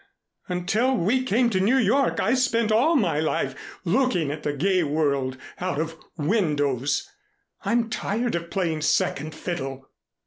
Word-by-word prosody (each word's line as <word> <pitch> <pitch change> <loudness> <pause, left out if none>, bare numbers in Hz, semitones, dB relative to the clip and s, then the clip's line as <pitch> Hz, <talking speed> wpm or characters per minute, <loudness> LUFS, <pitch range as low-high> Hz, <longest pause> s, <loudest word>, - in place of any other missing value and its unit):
Until 205 +9 +1
we 225 +9 +2
came 240 0 +2
to 190 - +1
New 220 +8 +3
York 265 +3 +2
I 225 - +2
spent 235 -4 +2
all 255 +10 +4
of 305 - +4
my 170 -9 +1
life 155 -3 0 0.3
looking 180 - +1
at 150 +1 -5
the 150 - -1
gay 185 +6 +1
world 140 -4 0 0.2
out 180 -5 -2
of 165 +1 -2 0.2
windows. 145 - 0 0.6
I'm 235 -1 +2
tired 225 +2 -2
of 170 0 -3
playing 165 -5 -1
second 155 0 0
fiddle." 135 -6 -5
180 Hz, 150 wpm, -25 LUFS, 150-230 Hz, 0.6 s, all